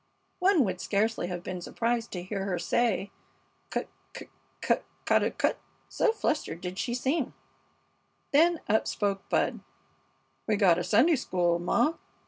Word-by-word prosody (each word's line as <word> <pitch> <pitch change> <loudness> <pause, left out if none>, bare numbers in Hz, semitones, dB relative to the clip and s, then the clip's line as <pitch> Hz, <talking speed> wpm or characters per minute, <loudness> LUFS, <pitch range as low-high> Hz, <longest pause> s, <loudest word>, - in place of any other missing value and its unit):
One 365 -5 +4
would 185 -4 -3
scarcely 215 -1 0
have 175 -1 -5
been 180 -1 -5
surprised 230 +5 -1
to 180 -2 -4
hear 195 +1 -4
her 185 -3 -1
say, 200 +2 0 0.6
"Cut - - -2 0.3
cut - - -9 0.3
cut - - +1 0.2
ca - - +4
daw - - +1
cut?" - - 0 0.3
so 465 - +2
fluttered 310 - -2
did 180 +1 -5
she 240 - -1
seem. 265 +3 -1 1.0
Then 330 +3 +4
up 220 +1 +2
spoke 200 -2 -2
Bud. - - +1 0.9
"We 215 - +2
gotta 180 -4 +4
Sunday 240 - +4
school, 175 -7 +1
ma!" 235 - +2
205 Hz, 145 wpm, -28 LUFS, 180-260 Hz, 1.0 s, One